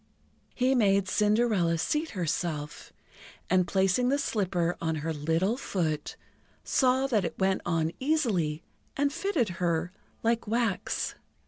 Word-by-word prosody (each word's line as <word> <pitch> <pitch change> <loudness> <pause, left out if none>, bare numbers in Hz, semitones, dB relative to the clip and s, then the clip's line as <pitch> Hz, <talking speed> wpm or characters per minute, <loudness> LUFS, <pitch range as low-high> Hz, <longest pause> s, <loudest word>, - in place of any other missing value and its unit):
He 255 +1 +2
made 200 -5 +3
Cinderella 210 -4 +2
seat 305 - -1
herself, 155 -3 -3 0.6
and, 185 -1 +3
placing 195 +7 +2
the 280 - +2
slipper 180 -9 0
on 160 -1 0
her 165 - -1
little 165 +9 0
foot, 160 - -2 0.5
saw 260 0 +2
that 225 -7 +1
it 165 -2 -4
went 190 0 +1
on 165 -2 +1
easily 210 - 0 0.3
and 285 0 +1
fitted 335 - 0
her 170 0 0 0.3
like 230 0 +1
wax. 225 -3 -1
195 Hz, 125 wpm, -28 LUFS, 165-245 Hz, 0.6 s, made